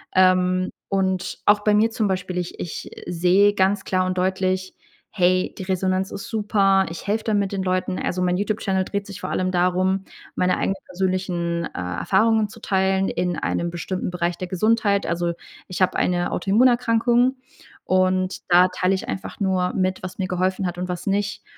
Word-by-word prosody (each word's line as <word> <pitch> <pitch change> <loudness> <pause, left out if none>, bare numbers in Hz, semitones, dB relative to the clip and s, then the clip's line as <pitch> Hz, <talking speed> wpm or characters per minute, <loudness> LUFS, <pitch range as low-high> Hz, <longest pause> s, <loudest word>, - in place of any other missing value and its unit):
Ähm, 185 0 +3 0.2
und 190 -1 -1
auch 205 0 +5
bei 210 0 +2
mir 220 +2 +4
zum 220 -2 -1
Beispiel, 185 -1 -2
ich 175 -1 -4
ich, 170 - -6
äh, - - -8
sehe 185 +4 +4
ganz 190 0 +1
klar 185 -1 +1
und 185 0 -2
deutlich, 185 0 -1 0.3
hey, 185 -1 +1
die 190 - -5
Resonanz 185 0 -1
ist 200 - -7
super. 200 -3 +2
Ich 165 - -8
helfe 215 +2 0
damit 205 -3 0
den 195 -1 -2
Leuten. 185 0 -1
Also 180 0 -2
mein 180 0 +1
YouTube-Channel 200 -2 0
dreht 200 -1 -3
sich 200 - -8
vor - - -4
allem 185 0 -1
darum, 185 +2 +1 0.3
meine 180 0 +1
eigenen 195 - 0
persönlichen, 175 -2 -2
äh, - - -6
Erfahrungen 205 - +1
zu - - -13
teilen 190 0 +1
in 180 -2 -1
einem 170 - -1
bestimmten 180 +2 -3
Bereich 175 -1 -2
der 185 - -5
Gesundheit. 200 +2 +1
Also, 170 0 -1 0.3
ich 185 +1 -5
habe 185 - +2
eine 175 -1 0
Autoimmunerkrankung. 240 +3 +3 0.5
Und 185 0 +1
da 180 +1 +6
teile 185 +1 +1
ich 190 - -5
einfach 190 - -5
nur 185 -2 +1
mit, 185 -1 -1
was 185 - -6
mir 190 -2 -2
geholfen 185 +1 0
hat 175 0 -3
und 180 +1 -3
was 180 -1 -5
nicht. 200 +1 -1
185 Hz, 180 wpm, -22 LUFS, 180-200 Hz, 0.5 s, da